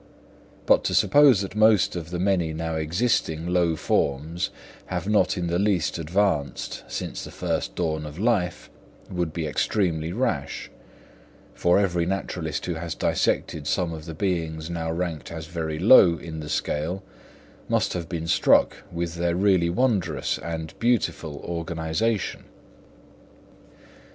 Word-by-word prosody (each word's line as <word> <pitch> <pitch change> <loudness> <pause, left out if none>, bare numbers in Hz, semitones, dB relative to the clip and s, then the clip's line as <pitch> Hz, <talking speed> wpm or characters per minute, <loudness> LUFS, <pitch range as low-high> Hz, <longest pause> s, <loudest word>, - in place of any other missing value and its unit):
But - - +4
to - - 0
suppose 140 -8 +6
that 100 - -5
most 110 -2 +4
of 85 -2 -5
the 90 - -3
many 90 -3 +1
now 80 +1 -3
existing 80 0 0
low 90 -2 +2
forms 75 +3 0 0.4
have - - -3
not 105 -1 +2
in 90 - -1
the 85 +1 0
least 95 -5 +1
advanced 85 -3 -1
since - - -5
the - - -8
first - - -3
dawn 80 -3 -1
of 75 +1 -9
life 100 -4 0 0.4
would 90 -3 -1
be 80 0 -3
extremely 80 -1 0
rash; 90 - -2 0.8
for 90 +1 +3
every 90 -4 +1
naturalist 90 -5 -3
who 90 - -2
has 80 0 -5
dissected 75 -3 0
some 90 -3 0
of 80 -1 -8
the 80 - -7
beings 80 -3 -2
now 80 -1 -2
ranked 85 -3 -3
as 80 -1 -6
very 80 -2 -4
low 90 -3 +7
in 80 -2 -7
the 75 -1 -7
scale, 85 +8 -2 0.7
must - - +1
have 85 -2 -4
been 80 -2 -3
struck - - +4
with 85 -1 -3
their 85 0 0
really 95 -3 +3
wondrous 110 -1 0
and 80 -1 -5
beautiful 115 -10 0
organisation. 85 +5 -2
85 Hz, 140 wpm, -25 LUFS, 80-95 Hz, 0.8 s, low